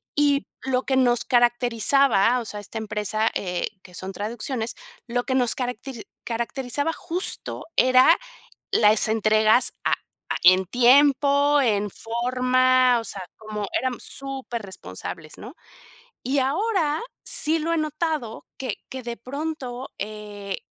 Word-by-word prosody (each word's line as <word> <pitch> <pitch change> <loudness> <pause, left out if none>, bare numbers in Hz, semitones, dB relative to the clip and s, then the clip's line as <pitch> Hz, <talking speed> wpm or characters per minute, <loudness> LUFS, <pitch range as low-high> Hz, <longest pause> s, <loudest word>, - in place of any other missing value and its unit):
Y 290 -1 +2 0.2
lo 260 -1 0
que 265 -1 0
nos 245 -2 +3
caracterizaba, 240 -1 +3
o 235 - -6
sea, 210 -1 -7
esta 205 +2 -8
empresa, 215 0 -1
eh, 180 -2 -2 0.2
que 180 - -15
son 190 +2 -6
traducciones, 225 +3 -3 0.3
lo 245 +1 -1
que 260 - -1
nos 245 -3 +1
caracte 250 -1 -5 0.2
caracterizaba 245 +5 -1
justo 345 +3 -3
era 255 +6 +6 0.5
las 215 0 +4
entregas 215 +2 +3
a - - +3 0.4
a - - +1
en 185 +1 +6
tiempo, 280 +4 +4
en 210 -4 +1
forma. 255 +2 +2
O - - -8
sea, 200 -3 -6 0.2
como, 215 -1 -5
éramos 255 -2 -3
superresponsables, 210 - -6
¿no? 245 - -10 0.7
Y 270 +3 +1
ahora 315 - 0 0.2
sí 320 +1 +4
lo 330 +2 -1
he - - +1
notado 305 -6 -3
que 255 -6 -4
que 260 -1 -7
de 235 0 -5
pronto, 265 -1 -5
eh, 205 -2 -6
245 Hz, 130 wpm, -24 LUFS, 215-275 Hz, 0.7 s, era